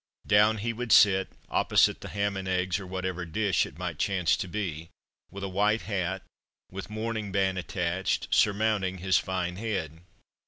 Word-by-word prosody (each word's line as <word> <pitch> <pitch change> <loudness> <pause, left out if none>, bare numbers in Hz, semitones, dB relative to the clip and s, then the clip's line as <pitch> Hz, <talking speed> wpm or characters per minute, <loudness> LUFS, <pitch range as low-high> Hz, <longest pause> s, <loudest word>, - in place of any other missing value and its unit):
Down 105 +2 +4
he 115 +3 -2
would 120 0 -4
sit, 95 -2 +6 0.2
opposite - - +2
the - - -7
ham 100 0 -1
and 95 -1 -4
eggs 90 0 0
or 95 - -8
whatever 95 -1 -3
dish 95 +2 0
it - - -14
might 85 -3 -5
chance 95 -4 +2
to - - -4
be 85 -4 -4 0.4
with 100 0 -8
a - - -1
white 105 +3 +1
hat, 95 -1 -2 0.5
with 95 +2 -7
mourning 110 -1 -3
band 95 -1 +1
attached, 90 +1 -1
surmounting 105 -3 +2
his 95 +1 +2
fine 90 -1 -3
head. 90 -8 -4
95 Hz, 165 wpm, -28 LUFS, 90-105 Hz, 0.5 s, sit